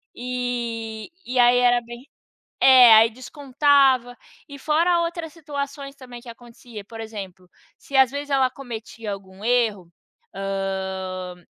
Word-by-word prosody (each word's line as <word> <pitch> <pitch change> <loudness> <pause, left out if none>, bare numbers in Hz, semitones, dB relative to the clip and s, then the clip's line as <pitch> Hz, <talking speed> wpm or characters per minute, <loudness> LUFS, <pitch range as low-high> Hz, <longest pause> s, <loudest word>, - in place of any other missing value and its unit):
e 240 -2 -4 0.2
e 250 +1 -2
aí 245 0 +5
era 245 -1 +3
bem 240 +2 -12 0.6
é, 255 -3 +8
aí 225 +1 +5
descontava, 265 -1 +1 0.3
e 280 - -9
fora 335 +4 +1
outras 335 -1 -4
situações 280 -3 -7
também 250 -3 -12
que 245 - -18
acontecia, 235 -2 -12
por 225 +2 -11
exemplo, 195 -5 -9 0.3
se 280 - -10
às 265 -2 +5
vezes 285 +1 -6
ela 265 -2 +2
cometia 230 -4 -8
algum 195 +1 -11
erro, 220 -8 0 0.4
hã, 190 -2 -4
245 Hz, 130 wpm, -22 LUFS, 220-275 Hz, 0.6 s, é